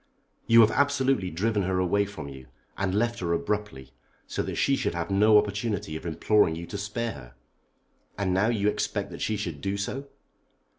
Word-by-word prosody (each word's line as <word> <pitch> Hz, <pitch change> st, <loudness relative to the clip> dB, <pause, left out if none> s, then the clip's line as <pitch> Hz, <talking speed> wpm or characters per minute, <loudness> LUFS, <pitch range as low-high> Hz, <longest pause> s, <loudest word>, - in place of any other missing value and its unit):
"You 115 Hz, 0 st, +8 dB
have 110 Hz, 0 st, +5 dB
absolutely 135 Hz, -8 st, +1 dB
driven 105 Hz, +5 st, 0 dB
her 95 Hz, 0 st, 0 dB
away 95 Hz, +3 st, +2 dB
from 95 Hz, -8 st, -8 dB
you, 65 Hz, -2 st, -10 dB, 0.3 s
and 95 Hz, -1 st, -1 dB
left 115 Hz, +2 st, 0 dB
her 85 Hz, -2 st, -1 dB
abruptly, 85 Hz, -8 st, -3 dB, 0.3 s
so -, -, -3 dB
that -, -, -4 dB
she 140 Hz, -, +2 dB
should -, -, -2 dB
have 85 Hz, +3 st, -3 dB
no 105 Hz, +2 st, +6 dB
opportunity 105 Hz, -5 st, -1 dB
of 80 Hz, -, -6 dB
imploring 85 Hz, +2 st, +2 dB
you 85 Hz, +1 st, -6 dB
to 100 Hz, -, -6 dB
spare 115 Hz, +3 st, -3 dB
her. -, -, -11 dB, 0.8 s
And 95 Hz, -2 st, 0 dB
now 95 Hz, +4 st, +3 dB
you 110 Hz, -3 st, +1 dB
expect 105 Hz, -, -1 dB
that -, -, -8 dB
she 110 Hz, -, 0 dB
should 85 Hz, -8 st, -5 dB
do 100 Hz, +4 st, -2 dB
so?" 135 Hz, +7 st, -4 dB
100 Hz, 190 wpm, -27 LUFS, 85-110 Hz, 0.8 s, You